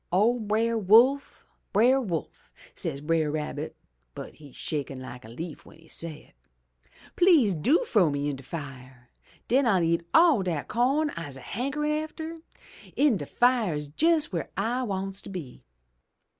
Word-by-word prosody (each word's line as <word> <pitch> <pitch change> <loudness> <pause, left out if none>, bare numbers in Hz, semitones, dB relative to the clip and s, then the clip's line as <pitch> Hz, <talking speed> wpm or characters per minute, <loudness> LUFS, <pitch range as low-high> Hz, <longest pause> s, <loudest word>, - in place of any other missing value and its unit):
"'O 220 +7 +3
Brer 225 +2 0
Wolf! 235 +8 +4 0.3
Brer 250 +6 +4
Wolf!' 170 - -5 0.2
says 140 - -4
Brer 160 0 +1
Rabbit 150 0 -4 0.4
(but - - -8
he's 145 -4 -15
shakin' 140 -3 -4
like 130 -1 -9
a 110 - -12
leaf 160 +7 -7
w'en - - -17
he 165 - -20
say 160 -1 -6
it). - - -46 0.8
Tlease 325 - +5
do 250 - +2
frow 205 - +3
me 145 0 -2
in 145 - -2
de 135 - -10
fire. 130 -4 -9 0.4
Den 260 +2 +3
I'll 190 -6 +3
eat 165 0 +1
all 325 - +5
dat 170 -6 -3
co'n 275 +6 +1
I'se 145 - -7
hankerin' 275 - -3
atter. 320 +1 -7 0.6
In 285 -7 +3
de - - -6
fire's 210 - +1
jes' 325 -1 +3
w'ere 170 -3 -4
I 230 +6 0
wants 195 -4 -3
to - - -11
be. 170 -10 -8
195 Hz, 155 wpm, -27 LUFS, 150-255 Hz, 0.8 s, Tlease